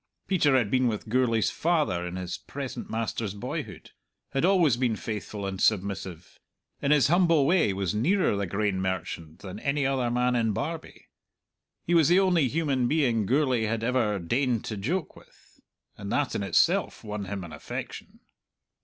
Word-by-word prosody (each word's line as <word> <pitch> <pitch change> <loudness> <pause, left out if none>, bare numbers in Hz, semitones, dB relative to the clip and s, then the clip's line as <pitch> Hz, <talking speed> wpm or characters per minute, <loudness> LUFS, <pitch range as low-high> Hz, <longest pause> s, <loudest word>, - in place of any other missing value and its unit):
Peter 150 -8 +3
had 110 -5 0
been 130 -1 +3
with 110 -1 -3
Gourlay's 115 -5 +2
father 155 - 0
in 90 - -6
his 90 -1 -4
present 140 -2 -7
master's 110 -2 -3
boyhood, 100 - -6 0.4
had 135 - -1
always 175 -8 +4
been 120 -2 0
faithful 105 -1 -5
and 95 -1 -4
submissive; 95 -4 -1 0.4
in 140 - 0
his 145 -5 +5
humble 170 -3 +4
way 165 - +3
was 95 -2 -2
nearer 160 - +2
the 100 -1 -2
grain 100 0 -1
merchant 85 -4 -4
than 95 -2 -7
any 140 0 0
other 130 -3 0
man 125 +1 +1
in 115 -3 +1
Barbie. 160 - -5 0.8
He 175 - -1
was 165 -3 +5
the 175 +3 +5
only 180 -7 +3
human 140 -4 0
being 120 -8 +1
Gourlay 130 -3 +2
had 110 +1 -2
ever 115 -4 +1
deigned 120 +6 0
to 110 - -4
joke 150 - -3
with, - - -21 0.4
and 100 -1 -6
that 145 -2 0
in - - -2
itself 100 -3 +1
won 105 -2 -5
him 100 -1 -5
an 85 -2 -9
affection. 75 - -7
115 Hz, 170 wpm, -27 LUFS, 100-145 Hz, 0.8 s, his